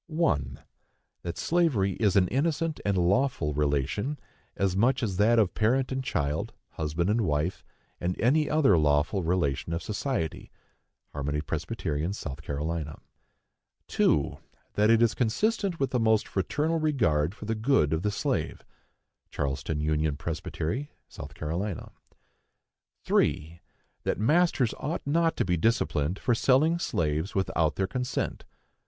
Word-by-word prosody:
1. 105 - 0 0.6
That 85 - -5
slavery 155 - +2
is 105 -3 +2
an 95 -2 +5
innocent 160 +3 0
and 100 -2 +1
lawful 90 - +1
relation, 75 - 0 0.4
as 95 -2 +1
much 120 +6 +2
as 95 -5 -1
that 110 +4 +4
of 105 -5 +3
parent 125 +5 +1
and 130 0 -2
child, 75 - -2 0.2
husband 80 +3 -2
and 110 +3 +2
wife, 80 0 -1 0.4
or 85 - 0
any 145 +6 +2
other 140 - +4
lawful 75 +6 +2
relation 85 -3 0
of 85 - -3
society. 105 - -3 0.6
(Harmony 75 +1 -2
Pres., 80 +1 -4
S. 85 -3 -2
C.) 75 +3 -3 1.1
2. 70 - +2 0.4
That 105 +1 +3
it 115 0 +5
is 115 - +3
consistent 190 - 0
with 135 - 0
the 125 - +1
most 110 -1 +2
fraternal 150 - 0
regard 105 - +1
for 105 - -9
the 110 - -1
good 110 - +2
of 80 - 0
the 105 - 0
slave. 105 0 -2 0.6
(Charleston 70 +2 -2
Union 75 -1 0
Pres., 80 +1 -3
S. - - -10 0.6
C.) 85 +6 -4 1.3
3. 85 +2 0 0.4
That - - -2
masters 145 -1 +3
ought 155 +5 -3
not 165 +3 +1
to - - +1
be 90 -1 +1
disciplined 90 - +1
for 120 - +1
selling 145 +8 +3
slaves 80 - -1
without 85 -5 +1
their 95 - 0
consent. 125 +6 -3
100 Hz, 135 wpm, -28 LUFS, 80-130 Hz, 1.3 s, an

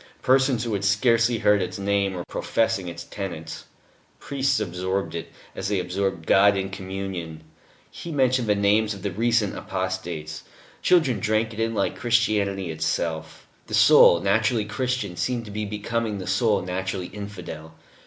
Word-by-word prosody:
Persons 130 -2 +3
who 115 -2 -2
had 100 -1 -2
scarcely 115 +3 +3
heard 105 -2 +3
its 90 - -3
name 100 -1 0
were 85 - -5
professing 110 -5 -1
its 85 -1 -6
tenets; 85 -5 -7 0.5
priests 140 -2 0
absorbed 95 0 -2
it, 85 -1 -6 0.2
as - - -3
they 100 -1 0
absorbed 90 -2 -2
God 100 +3 +5
in 95 0 -3
Communion 95 -4 -6 0.5
he 170 - -8
mentioned 130 -5 +1
the 105 - +4
names 105 +1 +2
of 100 - -11
the 100 - -1
recent 115 +1 +1
apostates 85 -5 -4 0.4
children 160 -10 +3
drank 110 +1 0
it 110 - -8
in 115 0 0
like 100 - 0
Christianity 105 -7 +1
itself. 80 0 -3 0.2
The - - -2
soul 85 - +7
"naturally 110 +2 +2
Christian" 105 -2 -2
seemed 120 +5 -2
to 105 - -9
be 105 +1 -3
becoming 105 +1 -2
"the 95 - -6
soul 100 +3 +1
naturally 95 0 -3
infidel." 90 -6 -8
100 Hz, 155 wpm, -24 LUFS, 95-115 Hz, 0.5 s, soul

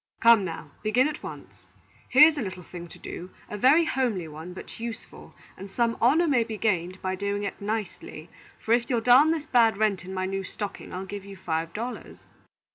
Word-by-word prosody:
Come, 230 -3 +6
now, 165 -4 -6
begin 240 +6 +3
at 300 0 -5
once. - - -10 0.4
Here's 300 +4 +7
a 290 - -3
little 185 -4 -6
thing 175 0 -9
to - - -13
do, 180 - -8 0.2
a - - -3
very 275 +10 +5
homely 235 - -1
one, 160 +3 -9
but 185 - -10
useful, 230 0 -8 0.2
and 195 +1 -9
some 230 +3 0
honor 310 +9 +4
may 255 -6 +3
be 225 -1 -6
gained 185 -3 -1
by 185 0 -1
doing 200 +1 -2
it 200 - -5
nicely; 200 -6 -5 0.3
for, 225 - +1
if 235 0 +1
you'll 240 -3 +1
darn 250 +6 +6
this 320 -2 -1
bad 230 -7 +4
rent 210 -3 +1
in 185 - -8
my 185 0 -2
new 195 0 -3
stocking, 205 +1 -6
I'll 185 +1 -5
give 200 0 -7
you 200 0 -11
five 165 -2 -2
dollars." 240 +3 -7
210 Hz, 200 wpm, -26 LUFS, 185-240 Hz, 0.4 s, Here's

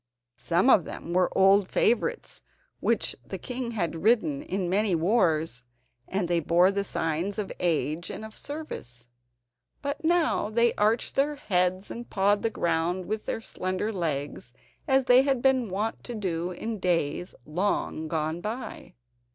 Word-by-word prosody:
Some 175 +7 +2
of 190 - +6
them 170 - -6
were 180 0 +3
old 195 0 +5
favourites 450 - 0 0.4
which - - 0
the - - -6
king 250 -2 -4
had 170 -8 -2
ridden 245 - +2
in 190 - -2
many 195 +1 +2
wars, 165 - +1 0.5
and 190 -2 -1
they 175 0 +2
bore 175 +4 +4
the 200 0 -1
signs 165 +2 -1
of 210 -2 -3
age 165 -1 0
and 215 - -6
of 220 - -11
service. 125 - -7 0.7
But 285 +3 -3
now 330 -9 +2
they 235 +2 +3
arched 215 +3 +1
their 290 +2 +1
heads, 185 -6 0
and 235 +1 -7
pawed 200 +1 +2
the 225 - +1
ground 175 -1 0
with 215 +2 -4
their - - -2
slender 185 +1 -3
legs 145 -8 -3 0.3
as 265 -1 +3
they 250 +1 +7
had 270 -2 +1
been 260 -3 +2
wont 210 +4 -2
to 240 - -5
do 175 -4 -2
in 220 +4 -5
days 175 -1 -1
long 160 -1 -1
gone 160 +1 -2
by. 225 +6 -6
195 Hz, 155 wpm, -27 LUFS, 170-235 Hz, 0.7 s, they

